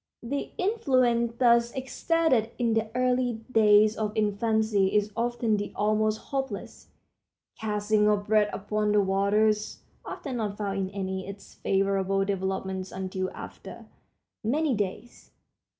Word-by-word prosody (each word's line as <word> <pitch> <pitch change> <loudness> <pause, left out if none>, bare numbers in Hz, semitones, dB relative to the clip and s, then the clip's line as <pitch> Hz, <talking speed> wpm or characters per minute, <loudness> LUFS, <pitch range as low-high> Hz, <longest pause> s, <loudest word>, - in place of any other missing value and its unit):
The 275 +4 -3
influence 255 - +1
thus 235 -1 +4
exerted 265 -2 +1
in 235 -2 +1
the 225 0 0
early 250 -1 +1 0.2
days 215 -1 +5
of 215 0 -3
infancy 215 -1 +1
is 210 0 +2
often 235 -1 0
the 205 - -4
almost 215 +1 +1
hopeless 265 -4 -5 0.7
"casting 210 -1 +1
of 205 -1 +1
bread 210 -1 +3
upon 210 +1 -1
the 210 - +5
waters"—often 210 +6 -1
not 210 -3 -3
found 200 -2 -2
in 190 -1 -2
any 190 -1 -4
of 200 - -5
its 200 - -17
favorable 195 0 0
developments 190 -1 -3
until 185 0 -3
after - - -10 0.6
"many 285 +6 +1
days." 205 +3 -5
215 Hz, 125 wpm, -27 LUFS, 200-235 Hz, 0.7 s, days